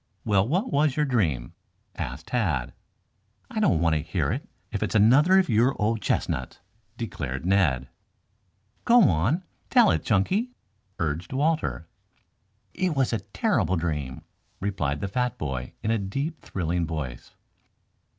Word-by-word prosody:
"Well, 100 -1 +3
what 185 - 0
was 145 -1 +3
your 150 - +2
dream?" 80 - 0 0.4
asked 65 +7 -6
Tad. 75 - 0 0.8
"I - - -2
don't 80 - +3
want 80 -1 +2
to 75 - +1
hear - - -1
it - - -4 0.2
if - - -3
it - - 0
is - - -5
another 135 - +6
of 190 - +4
your 120 +3 +2
old 110 +1 +1
chestnuts," - - -1 0.4
declared 70 - -4
Ned. 85 -10 +2 1.0
"Go 235 -1 +6
on, 110 - +1 0.3
tell 240 -5 +6
it, - - 0
Chunky," 190 - +1 0.4
urged 80 - -2
Walter. 150 - 0 0.9
"It 180 -3 0
was 135 -3 +1
a 115 - +1
terrible 95 - 0
dream," 75 -4 -3 0.4
replied 75 -8 -2
the 100 - -1
fat 125 +4 -1
boy 65 -4 -4
in 110 - +1
a 115 - +2
deep, 135 - -3
thrilling 85 -2 -2
voice. 70 -7 -6
100 Hz, 145 wpm, -26 LUFS, -, 1.0 s, another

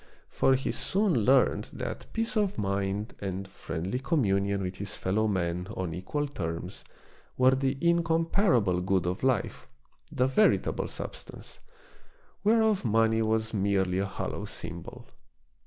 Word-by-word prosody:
For 135 - +3
he 135 - -1
soon 200 -1 +1
learned 125 +2 +3
that - - -5
peace 225 +1 -2
of 205 -2 +1
mind 100 +2 -1
and 95 0 -4
friendly 95 +4 -4
com 145 +1 +1
IntrodMctioii. - - +1
IX 100 0 +2
munion 100 - -1
with 90 0 -4
his 100 0 -6
fellow 110 +4 +1
men 90 -2 -1
on 90 -4 -2
equal 145 - -2
terms 90 - -5 0.5
were 130 0 +6
the 135 0 0
incomparable 165 - +2
good 95 -1 +1
of 90 +2 -2
life, 130 -6 0 0.4
the 125 - +2
veritable 135 +12 +2
substance, - - -8 0.8
whereof 220 -1 +3
money 115 -1 +3
was 110 0 0
merely 95 -2 +1
a 100 - 0
hollow - - -4
symbol. 85 0 -8
110 Hz, 140 wpm, -29 LUFS, 95-140 Hz, 0.8 s, were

